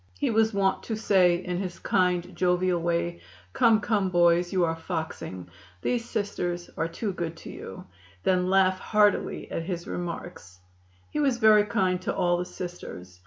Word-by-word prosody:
He 95 - 0
was 220 0 +3
wont 195 -2 +1
to 225 - -2
say 190 -5 +4
in 180 0 -3
his 180 -2 -4
kind, 180 -1 0
jovial 180 0 +1
way: 170 0 -1 0.3
"Come, 230 -3 +4
come, 205 -3 0
boys, 175 0 +3
you 185 -2 +2
are 165 0 -1
foxing; 160 - -5 0.4
these 240 -1 -1
Sisters 175 -5 -3
are 165 - -1
too 195 +5 -4
good 170 -2 -4
to - - -9
you," 95 - -9 0.4
then 185 -1 +2
laugh 190 -1 +3
heartily 210 -2 +1
at - - -2
his 175 -2 -4
remarks. 170 - -6 0.5
He - - -2
was 275 -5 +2
very 215 -2 +6
kind 185 -3 0
to - - -2
all 175 0 +2
the 180 - -2
Sisters. 90 - -8
180 Hz, 165 wpm, -27 LUFS, 175-200 Hz, 0.5 s, very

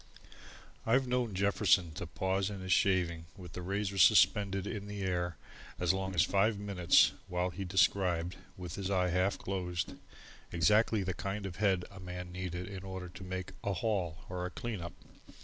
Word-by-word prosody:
I've 130 +4 +3
known 125 -4 -1
Jefferson 95 -3 +3
to 85 +3 -6
pause 95 +5 -1
in 100 -2 -6
his 95 -1 +1
shaving 85 -5 +2
with 90 -2 -10
the 90 - -5
razor 100 +2 -2
suspended 100 +1 +5
in 105 -2 -5
the 105 -1 -5
air 90 -2 -1 0.4
as 90 0 +3
long 95 0 -3
as 85 - +5
five 100 +3 +2
minutes 100 -4 +4 0.2
while 90 0 -1
he 100 +2 -5
described, 90 -2 +2 0.2
with 90 -3 -6
his 100 -1 -3
eye 90 -2 +2
half 90 +3 +1
closed, 90 -3 -3 0.6
exactly 105 +5 +3
the 95 0 -2
kind 100 +3 -4
of 90 -3 -6
a - - -13
head 95 -4 +2
a 100 - -11
man 90 0 -7
needed 90 0 -4
in 95 -2 -7
order 95 -2 -6
to 90 +2 -10
make 95 0 -5
a 100 - 0
"haul" 90 -4 -2
or 90 0 -3
a - - -6
"clean 115 -1 -5
up." 85 - -6
95 Hz, 185 wpm, -33 LUFS, 90-100 Hz, 0.6 s, suspended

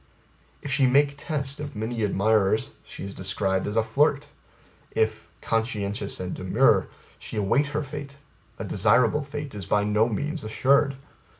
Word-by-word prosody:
If 140 - -5
she 135 0 +3
make 140 +2 +4
test 140 -2 -3
of 150 -1 -6
many 115 +2 -3
admirers, 105 +1 +2
she - - -10
is 100 0 -6
described 95 0 -1
as 105 - -3
a 115 - +3
flirt; 145 +5 +1 0.6
if, 110 -1 -1 0.2
conscientious 105 -3 -1
and 90 0 -4
demure, 90 0 +3 0.3
she - - -7
await 110 +8 +2
her 150 +1 -2
fate, 140 0 -8 0.4
a - - -5
desirable 125 +4 +3
fate 145 -1 -6
is 100 -4 -7
by 105 0 +2
no 105 +2 +2
means 150 +9 -3
assured. 135 +5 +2
115 Hz, 155 wpm, -25 LUFS, 105-140 Hz, 0.6 s, make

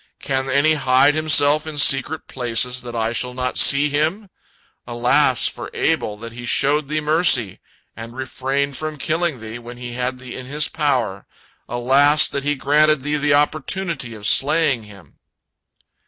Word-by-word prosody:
'Can 135 -1 -3
any 140 +4 +2
hide 135 0 +2
himself 155 -1 +3
in 155 -2 -7
secret 145 +2 +3
places 125 0 -1
that 120 -1 -9
I 115 0 -2
shall 125 +1 -2
not 125 0 -2
see 140 +2 +5
him?' 160 +8 -2 0.6
Alas 125 +2 +2
for - - -5
Abel 105 - -1
that 115 +2 -10
he 120 +1 -10
showed 140 +4 0
thee 155 +1 -2
mercy, 150 - +1 0.4
and 115 +1 -10
refrained 135 +2 -3
from 155 -1 -5
killing 165 -3 -2
thee, 110 +2 -8
when 120 +1 -11
he 120 0 -8
had 125 +1 -4
thee 125 -1 -10
in 130 -1 -9
his 150 +2 +1
power! 125 -10 -2 0.4
Alas 140 +5 +3
that 140 - -5
he 145 +1 -1
granted 150 +1 +2
thee 150 +1 -2
the 145 0 +1
opportunity 150 -3 -2
of 105 -1 -10
slaying 140 -2 +2
him!" 100 -2 -17
135 Hz, 160 wpm, -19 LUFS, 120-150 Hz, 0.6 s, see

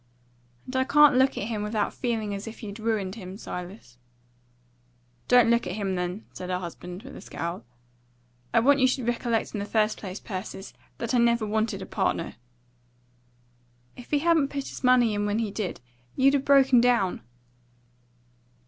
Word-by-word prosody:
"And 255 - -8
I 260 - +3
can't 295 0 +6
look 265 +1 +3
at - - -2
him 215 -1 -3
without 210 0 -1
feeling 225 -4 -2
as 200 +2 -6
if 225 +1 -9
you'd 205 0 -7
ruined 215 -4 -1
him, 190 -3 -8
Silas." 180 - -8 1.3
"Don't 245 -2 +5
look 235 -4 +2
at 180 - -3
him, 200 -3 -2
then," 180 +3 -3
said 180 - -7
her 180 - 0
husband, 180 +2 -8
with 270 - -10
a - - -9
scowl. 170 -6 -5 0.9
"I 230 - +4
want 285 +4 +4
you 260 - +5
should 260 -1 -1
recollect 235 -1 -1
in 210 - -3
the - - -2
first 215 0 +1
place, 190 -1 -6
Persis, 190 -1 -7 0.2
that 235 +1 -3
I 245 - +4
never 235 -1 +3
wanted 215 +1 -1
a - - -7
partner." - - -1 1.6
"If 245 - -12
he 295 - +2
hadn't 320 -1 +3
put 280 -1 -5
his - - -9
money 250 -3 +4
in 205 0 -1
when 205 +1 0
he 225 -3 -1
did, 200 - -4 0.3
you'd 275 +1 +4
'a' 285 - +3
broken 270 -2 +5
down." 235 -7 +2
225 Hz, 175 wpm, -26 LUFS, 200-250 Hz, 1.6 s, can't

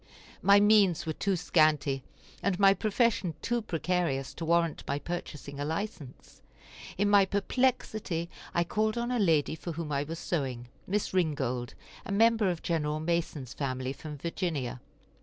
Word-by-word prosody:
My 200 0 +6
means 200 -6 +4
were 160 - -2
too 195 +4 0
scanty, 155 -5 +2 0.4
and 200 -2 0
my 195 -1 +7
profession 210 -5 +1
too 240 0 0
precarious 165 -7 -1
to 165 - -5
warrant 170 -1 +1
my 140 - 0
purchasing 145 -3 -6
[a] - - -1
license. 160 - -6 0.6
In 205 +2 +2
my 205 -1 +6
perplexity 200 -4 0 0.2
I 170 - +2
called 215 +5 0
on 240 +1 -1
a 245 - +1
lady 160 -8 +3
for 165 +1 -6
whom 160 -1 -5
I 140 -1 +1
was 160 +3 -6
sewing, 130 -9 -3 0.2
Miss 205 +1 -1
Ringold, 140 -9 -1 0.3
a - - -6
member 220 0 +4
of 175 -2 -3
Gen. 155 -2 -1
Mason's 160 -6 -2
family, 130 -1 -3
from 150 0 -8
Virginia. 145 -6 -3
170 Hz, 155 wpm, -29 LUFS, 145-200 Hz, 0.6 s, my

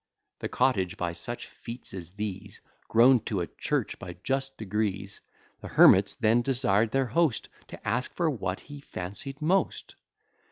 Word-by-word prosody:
The - - -4
cottage, 105 -7 +1
by 90 -3 -1
such 120 +8 -5
feats 120 +1 -7
as 90 -4 -6
these, 100 -1 -6 0.3
Grown 120 +3 +6
to 100 -5 -1
a - - -1
church - - -2
by 90 -1 -8
just 135 0 -2
degrees, 100 -2 -3 0.4
The - - -8
hermits - - +6
then 115 +2 +3
desired 115 -4 +2
their 135 +3 +1
host 135 0 +1 0.2
To - - -10
ask 120 +4 0
for 170 - +1
what 95 - -2
he 145 0 -10
fancy'd 135 - -6
most. 185 +5 0
110 Hz, 155 wpm, -28 LUFS, 95-135 Hz, 0.4 s, Grown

